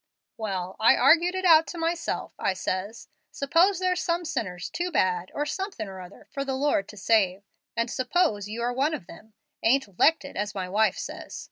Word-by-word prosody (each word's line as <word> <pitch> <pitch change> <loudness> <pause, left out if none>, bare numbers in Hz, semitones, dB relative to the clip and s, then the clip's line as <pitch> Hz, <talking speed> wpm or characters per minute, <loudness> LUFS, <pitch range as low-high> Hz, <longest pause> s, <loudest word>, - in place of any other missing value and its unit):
"Well, 190 -4 -4
I 220 - +6
argued 335 +7 +4
it 375 0 -2
out 325 -2 +7
to 350 - -7
myself. 335 0 -2
I 195 - +1
says, 190 +4 -4 0.2
'Suppose 340 +7 +2
there's 365 0 0
some 340 0 -1
sinners 205 - -4
too 350 +1 -2
bad, 185 - 0
or 295 - -1
too 295 - -3
somethin' 385 - -4
or 190 -1 -8
other, 180 +2 -13
for 275 -2 -3
the 270 -1 -2
Lord 265 -8 +1
to 210 - -12
save, 195 -2 +2 0.3
and 230 +1 +1
suppose 255 - 0
you 230 +2 -4
are 245 +1 0
one 285 +5 +1
of 180 - -9
them, 215 +4 -14 0.3
ain't 225 -6 +1
''lected,' 320 +2 +3
as 205 +1 -3
my 185 -2 -3
wife 210 +4 +2
says. - - -7
240 Hz, 200 wpm, -26 LUFS, 200-330 Hz, 0.3 s, out